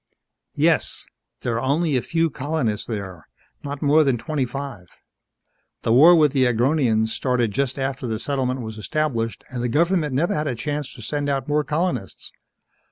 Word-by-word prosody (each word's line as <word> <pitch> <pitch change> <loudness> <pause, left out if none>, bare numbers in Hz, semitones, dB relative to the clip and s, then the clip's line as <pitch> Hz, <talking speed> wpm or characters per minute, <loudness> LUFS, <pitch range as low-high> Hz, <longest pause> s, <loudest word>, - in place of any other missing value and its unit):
"Yes. - - +2 0.4
There 115 -2 -1
are - - -2
only 145 +3 +1
a 125 - +2
few 165 +2 0
colonists 130 -8 -2
there 95 -7 -6 0.4
not 145 +1 -5
more 150 +2 +5
than 135 -4 +1
twenty 140 +1 -2
five. 135 -8 -7 1.0
The 115 - +2
war 160 +8 +8
with 150 -4 +4
the 130 -2 +3
Agronians 120 -2 +2
started 120 -2 0
just 135 +3 -1
after 135 -2 -3
the 110 -1 -2
settlement 130 +1 -2
was 110 -1 -7
established 120 -3 -2
and 125 -2 -4
the 120 - -1
government 160 0 +1
never 165 +6 +1
had 150 0 -1
a 130 - -1
chance 145 +3 -3
to 120 - -10
send 145 +4 -2
out 135 -2 -1
more 150 +1 +1
colonists. 150 - -3
135 Hz, 170 wpm, -22 LUFS, 120-150 Hz, 1.0 s, war